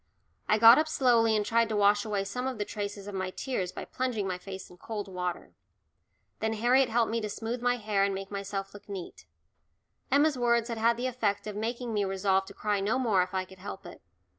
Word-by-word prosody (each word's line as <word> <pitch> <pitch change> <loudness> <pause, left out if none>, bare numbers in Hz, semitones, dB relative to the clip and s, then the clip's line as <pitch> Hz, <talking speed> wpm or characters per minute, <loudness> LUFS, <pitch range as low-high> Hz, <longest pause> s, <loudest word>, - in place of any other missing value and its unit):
I 215 - +5
got 230 +4 +9
up 315 - +1
slowly 235 -7 +3
and 210 -1 +1
tried 230 +1 +2
to 215 - -1
wash 205 +1 +4
away 205 -2 -1
some 250 +6 -3
of 260 -3 -3
the 205 - -2
traces 205 -1 -5
of 205 - -7
my 185 -1 -2
tears 190 -4 -3
by - - -7
plunging 250 -6 -2
my 180 -1 -3
face 190 0 -8
in 180 - -15
cold 210 +1 -5
water. 180 -2 -4 0.9
Then 220 0 0
Harriet 245 +4 +3
helped 230 -1 +2
me 230 0 0
to 210 - -3
smooth 230 +3 -4
my 245 0 +2
hair 210 -3 0
and 200 -1 +1
make 195 +1 -6
myself 195 -1 -4
look 205 0 -13
neat. 185 - -8 0.8
Emma's 285 0 +3
words 235 -1 +2
had 230 -1 -3
had 230 +1 +3
the 245 - -3
effect 230 -6 -1
of 210 -1 -5
making 235 +2 -3
me 205 -1 +1
resolve 195 0 +1
to 200 - -11
cry 210 -1 0
no 205 +6 +1
more 220 -8 +2
if 185 +1 -3
I 185 0 0
could 190 0 -16
help 190 - -8
it. - - -11
210 Hz, 230 wpm, -29 LUFS, 195-235 Hz, 0.9 s, got